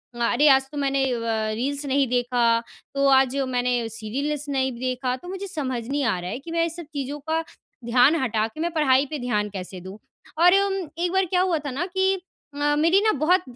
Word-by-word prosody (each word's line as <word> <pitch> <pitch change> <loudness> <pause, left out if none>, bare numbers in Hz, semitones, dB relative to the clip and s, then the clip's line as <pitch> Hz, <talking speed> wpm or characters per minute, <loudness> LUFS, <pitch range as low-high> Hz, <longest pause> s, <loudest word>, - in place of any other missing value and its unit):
अ, - - -10 0.2
अरे! 290 +5 +4
आज 270 -1 +6
तो 295 - -7
मैंने 275 -1 +1 0.2
व - - -5 0.3
रील्स 280 +5 -2
नहीं 275 0 +2
देखा 245 -1 +2 0.4
तो 275 0 +2
आज 265 0 +4
मैंने 245 -2 0
सीरियल्स 270 +7 -3
नहीं 265 -1 0
देखा 255 0 -1
तो 260 +7 -12
मुझे 385 +1 -5
समझ 265 -9 -3
नहीं 285 +2 -1
आ 225 -7 +1
रहा 175 +1 -5
है 230 +6 -4
कि 330 +4 -10
मैं 335 0 +1
इस 330 -1 -4
सब 340 -1 -7
चीज़ों 285 +1 -4
का 320 +1 +1 0.4
ध्यान 245 +6 +4
हटा 220 -3 0
के 225 - -13
मैं 340 +1 -1
पढ़ाई 275 -4 +3
पे 300 - -4
ध्यान 210 -4 -1
कैसे 190 -2 -7
दूँ। 190 +2 -9 0.5
और 355 +1 +7
उम, 395 - -1 0.2
एक 345 +1 0
बार 380 0 +3
क्या 360 +1 +1
हुआ 365 -3 +1
था 285 - -3
ना 285 +7 -2
कि 380 +1 +1 0.4
अ, 295 0 +1
मेरी 335 +5 +4
ना 435 +1 +3
बहुत 360 +3 +4
275 Hz, 220 wpm, -24 LUFS, 245-325 Hz, 0.5 s, और